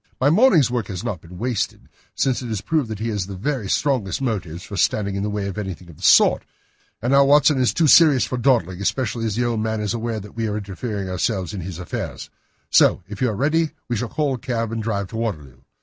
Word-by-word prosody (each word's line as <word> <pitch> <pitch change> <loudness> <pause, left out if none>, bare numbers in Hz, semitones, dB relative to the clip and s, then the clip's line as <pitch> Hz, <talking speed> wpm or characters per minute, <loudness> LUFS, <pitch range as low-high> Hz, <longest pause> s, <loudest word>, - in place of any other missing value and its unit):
My 140 +3 +3
morning's 170 - +5
work 120 -5 -2
has 95 -3 -5
not 90 -6 -4
been 90 +1 -12
wasted, 120 +1 -3 0.3
since 130 -1 0
it 125 - -6
has 110 -4 -3
proved 155 -7 0
that 110 - -4
he 115 +3 -3
has 100 -4 -2
the 100 - -7
very 115 0 -3
strongest 130 -9 0
motives 95 - -3
for 100 - -8
standing 100 +2 +1
in 100 - -2
the 105 - -1
way 105 -1 -3
of 100 +2 -5
anything 90 -4 -6
of 75 - -17
the - - -18
sort. - - +5 0.6
And 125 +3 +1
now, 140 0 +7
Watson, 145 0 +5
this 125 - +2
is - - -1
too 165 - +3
serious 150 -3 +6
for 125 - -3
dawdling, 105 -8 +1
especially 115 +1 -1
as 105 - -2
the 120 +1 0
old 115 -2 -1
man 110 0 -1
is 105 -2 -2
aware 115 -1 -3
that 105 0 -12
we 115 -1 -1
are 105 0 -2
interesting 100 0 -5
ourselves 95 +1 -2
in 100 - -5
his 90 -1 -6
affairs; 90 - -6 0.4
so - - +4
if 100 +1 -9
you 125 - +3
are 110 - -3
ready, 155 +7 +1 0.2
we 120 - 0
shall 115 +2 -3
call 150 -3 0
a 125 - -4
cab 115 -2 -2
and 115 -1 -3
drive 100 -3 -2
to 110 - -6
Waterloo. 75 - -4
110 Hz, 250 wpm, -22 LUFS, 100-125 Hz, 0.6 s, now